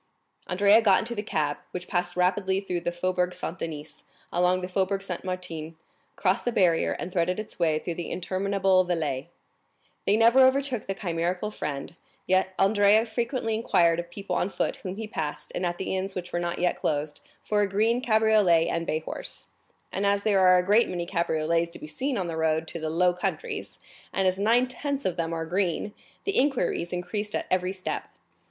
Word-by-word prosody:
Andrea 200 +4 +5
got 200 -4 +5
into 240 - -2
the 210 - -3
cab, 150 -8 -1
which 180 0 -6
passed 175 0 -1
rapidly 190 +1 +1
through 180 -3 -3
the 175 0 -2
Faubourg 180 0 -1
Saint 180 0 -5
Denis, 155 -2 -6 0.3
along 180 +1 +2
the 180 - -3
Faubourg 190 +1 0
Saint 180 -3 -5
Martin, 165 -4 -5 0.4
crossed 190 0 +1
the 245 - 0
barrier, 180 -7 +3
and 185 - -5
threaded 180 +2 +1
its 215 - -8
way 160 -3 +2
through 170 +2 -4
the 170 -1 -5
interminable 190 +1 +1
Villette. 155 -7 -2 0.8
They 205 - +4
never 230 +3 +5
overtook 260 -3 +3
the 195 - -2
chimerical 180 +2 -2
friend, 145 -4 -5 0.3
yet 185 0 +1
Andrea 205 +2 +4
frequently 235 0 -2
inquired 175 -6 +3
of 175 0 -5
people 190 0 -4
on 180 - 0
foot - - -2
whom 185 0 -6
he 220 +2 -5
passed 155 -8 -5
and 180 - -1
at 175 0 -3
the 190 - -2
inns 190 +1 -3
which 180 -1 -6
were 175 - 0
not 175 0 -2
yet 180 0 +1
closed, 150 0 -2 0.2
for 210 -1 +1
a 205 - +1
green 225 +5 +2
cabriolet 215 -8 +4
and 165 0 -2
bay 155 - 0
horse; - - -7 0.5
and 195 - -1
as 200 0 +2
there 205 -3 +3
are 185 -1 +6
a 180 - +1
great 210 +5 +4
many 175 -1 -3
cabriolets 170 -1 0
to 170 - -10
be - - -9
seen 255 - -2
on 185 - -1
the 165 -1 -4
road 160 0 +1
to 170 - -6
the 155 0 -3
Low 180 +3 +3
Countries, 420 - -4 0.3
and 190 -1 +1
as 185 +1 +1
nine 230 +5 +4
tenths 280 +2 -4
of 185 - 0
them 165 -1 -2
are 165 -1 -2
green, 185 +3 -1 0.3
the 400 - +1
inquiries 250 -10 0
increased 195 +4 -3
at - - -2
every 185 0 +1
step. 190 -1 -4
185 Hz, 200 wpm, -27 LUFS, 170-205 Hz, 0.8 s, are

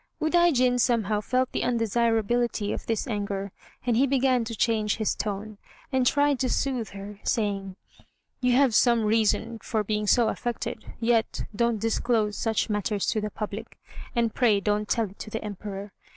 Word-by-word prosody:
Udaijin 310 -7 +3
somehow 220 -4 +2
felt 255 +4 0
the - - -2
undesirability 230 -1 +1
of - - -6
this 225 -1 -1
anger, 200 -3 -3 0.3
and 240 -2 +2
he 265 +4 +4
began 260 -2 +2
to 230 0 -5
change 215 -1 +1
his 215 -2 0
tone, 210 0 -4 0.3
and 260 -2 +2
tried 285 -1 +3
to 255 - 0
soothe 250 -6 -1
her, 200 +1 -9
saying: 200 -4 -1 0.6
"You 250 -1 +2
have 260 -2 +4
some 235 0 +4
reason 225 +1 +1
for 220 -1 -1
being 210 0 -1
so 235 +1 +4
affected; 240 -2 -4
yet 230 -1 +1
don't 235 +1 +1
disclose 220 -1 0
such 225 -1 0
matters 210 -1 -1
to 215 - -1
the 210 - -2
public, 210 +2 -6 0.4
and 235 -2 +1
pray 225 -5 +3
don't 210 +1 -1
tell 225 -5 0
it 200 - -19
to - - -7
the 220 +1 -4
Emperor. 200 0 -6
225 Hz, 165 wpm, -26 LUFS, 210-245 Hz, 0.6 s, he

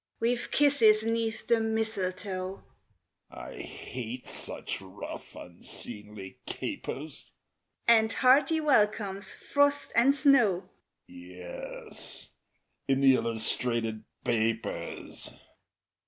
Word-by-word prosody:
_) - - -64 0.2
We've 240 +1 0
kisses 230 -7 +5
'neath 225 -1 -1
the 235 -1 +3
mistletoe 195 -4 -2 0.7
(I - - -9
hate 125 0 -7
such - - 0
rough, 95 +1 -9
unseemly 95 +3 -6
capers!) 150 +1 -6 0.5
And 225 -1 +6
hearty 275 +6 +4
welcomes, 210 -8 +2
frost 285 0 +1
and 260 +4 +5
snow; 255 -10 +4 0.4
(_Yes, 90 0 -6 0.6
in 135 0 +2
the 135 -1 +7
illustrated 115 -1 0 0.2
papers. 115 0 -2
195 Hz, 85 wpm, -29 LUFS, -, 0.7 s, the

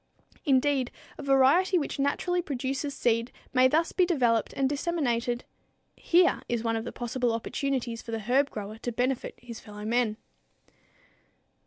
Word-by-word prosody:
Indeed, 270 -2 +2 0.3
a - - -4
variety 280 +7 +4
which 290 -2 -3
naturally 355 +6 +1
produces 275 -1 -3
seed 230 0 +1 0.2
may 255 0 +6
thus 320 +5 +1
be 370 - +3
developed 245 - +2
and 270 -1 +1
disseminated. 265 -5 -1 0.5
Here 350 +1 +3
is 235 -2 -1
one 225 -1 0
of 225 +1 -3
the - - -4
possible 245 0 -1
opportunities 240 0 -2
for - - -13
the 225 - -1
herb 265 +6 +2
grower 210 +1 -7
to 240 - -3
benefit 250 +2 -1
his 235 -2 -9
fellow 210 -1 -9
men. 230 -1 +1
255 Hz, 150 wpm, -28 LUFS, 235-285 Hz, 0.5 s, may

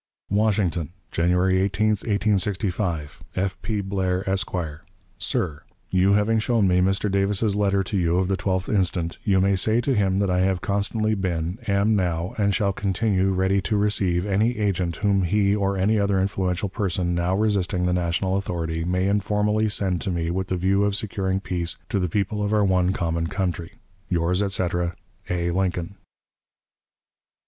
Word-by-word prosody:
"WASHINGTON, 100 -6 +1 0.2
January 90 +2 +2
18, 100 +3 +1
1865. 100 -5 -1
"F. 95 0 -2
P. 105 -2 -2
BLAIR, 95 -1 -1
Esq. 95 -1 0 0.7
"SIR: 75 -5 -1 0.3
You 95 +2 +3
having 105 +2 +2
shown 110 -3 +2
me 90 0 +3
Mr. 95 +2 +1
Davis's 100 +1 +1
letter 100 -1 +2
to 100 - -5
you 85 -2 +2
of 95 0 +1
the 95 - +1
12th 95 -1 -1
instant, 90 -3 0
you 95 -2 +3
may 100 +1 +3
say 110 +5 +2
to 135 +3 0
him 95 -4 +1
that 100 -2 +1
I 90 - +2
have 95 0 +1
constantly 105 +3 0
been, 90 -1 -2
am 100 +2 +2
now, 90 0 -1
and 100 -1 +3
shall 100 -3 +1
continue 95 0 0
ready 95 +1 +1
to 105 +3 -1
receive 95 -4 +1
any 105 +5 +1
agent 95 -5 0
whom 100 -2 +1
he 100 +2 +2
or 100 -1 0
any 105 +3 +2
other 100 -1 +1
influential 95 0 -1
person 90 -3 -1
now 85 +2 0
resisting 95 -4 +1
the 90 - +1
national 90 +2 0
authority 80 -4 -3
may 90 +2 0
informally 105 +2 +1
send 95 -4 0
to 100 - -3
me 85 -2 -1
with 95 +1 -2
the 95 - -1
view 95 +3 +2
of 100 -1 +1
securing 95 -3 -1
peace 90 -3 -2
to 105 -3 0
the 90 -2 -1
people 105 +3 -1
of 105 0 -1
our 105 -1 +3
one 95 -1 +2
common 85 -2 -1
country. 90 -2 -3 0.4
"Yours, 90 +2 +1
etc., 90 -3 -1 0.3
A. 85 -1 0
LINCOLN." 90 0 -1
95 Hz, 170 wpm, -24 LUFS, 90-100 Hz, 0.7 s, You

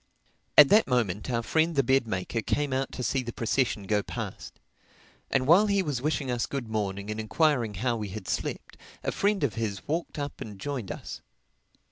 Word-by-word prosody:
At 145 -2 +10
that 215 +2 +5
moment 115 -5 0
our 115 -2 0
friend 160 +6 +1
the 140 - +4
bed 130 -1 +2
maker 110 +3 -2
came 145 +4 -1
out 135 +1 -1
to 125 - -4
see 130 +4 +1
the 120 -1 -5
procession 115 -2 0
go 105 +1 +1
past. - - -7 0.7
And 130 - +1
while 180 +9 +6
he 200 -1 +2
was 145 -7 -2
wishing 145 -2 -1
us 120 -1 -1
good 135 -4 -4
morning 100 -2 -2
and 105 - -4
enquiring 120 -1 +1
how 120 +4 0
we 105 -2 -4
had 95 -1 -7
slept, - - -3 0.3
a - - 0
friend 200 -3 +1
of 135 - +1
his 110 -4 -4
walked 165 +2 -2
up 145 -1 -5
and 105 -2 -7
joined 125 -4 -4
us. - - -7
125 Hz, 195 wpm, -28 LUFS, 110-145 Hz, 0.7 s, At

